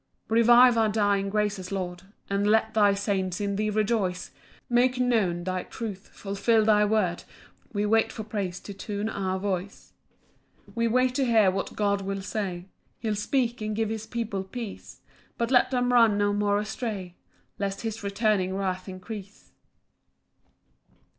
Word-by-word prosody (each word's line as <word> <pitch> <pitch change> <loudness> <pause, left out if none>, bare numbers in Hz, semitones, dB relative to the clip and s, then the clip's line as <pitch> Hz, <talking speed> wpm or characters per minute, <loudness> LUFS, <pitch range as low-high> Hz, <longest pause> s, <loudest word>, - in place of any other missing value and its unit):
3 225 +1 +3
Revive 240 +1 +7
our 220 -1 +3
dying 205 -2 +1
graces, 205 -2 -1
Lord, 180 -2 -4 0.3
And 200 +1 0
let 220 +1 +3
thy 205 -2 +4
saints 195 -2 -1
in 200 -1 -1
thee 215 +1 0
rejoice; 210 -4 -1 0.4
Make 250 +1 +2
known 210 -9 +1
thy 185 0 -2
truth, 205 -3 -7
fulfil 210 +3 +1
thy 210 -1 +5
word, 205 -5 0 0.5
We 205 -1 -1
wait 225 +1 +2
for 220 - -6
praise 200 -4 -4
to 200 - -8
tune 205 +2 -4
our 190 -3 -2
voice. 195 0 -4 0.7
4 - - -19
We 230 0 +1
wait 255 +2 +2
to 270 +1 +1
hear 220 -5 +4
what 195 +1 -4
God 200 -1 +1
will 195 0 -4
say; 190 -4 -4 0.3
He'll 220 -2 -2
speak, 240 +2 -1
and 215 0 -2
give 220 0 0
his 220 0 -4
people 220 -4 -3
peace; 225 +2 -8 0.4
But 235 +1 -1
let 250 -2 +5
them 245 -1 +1
run 230 -4 +5
no 205 0 +2
more 205 0 +1
astray, 210 -4 -4 0.5
Lest 195 -1 -2
his 225 -1 -4
returning 200 -2 0
wrath 190 -1 -3
increase. 200 +2 -9
210 Hz, 160 wpm, -27 LUFS, 195-225 Hz, 0.7 s, Revive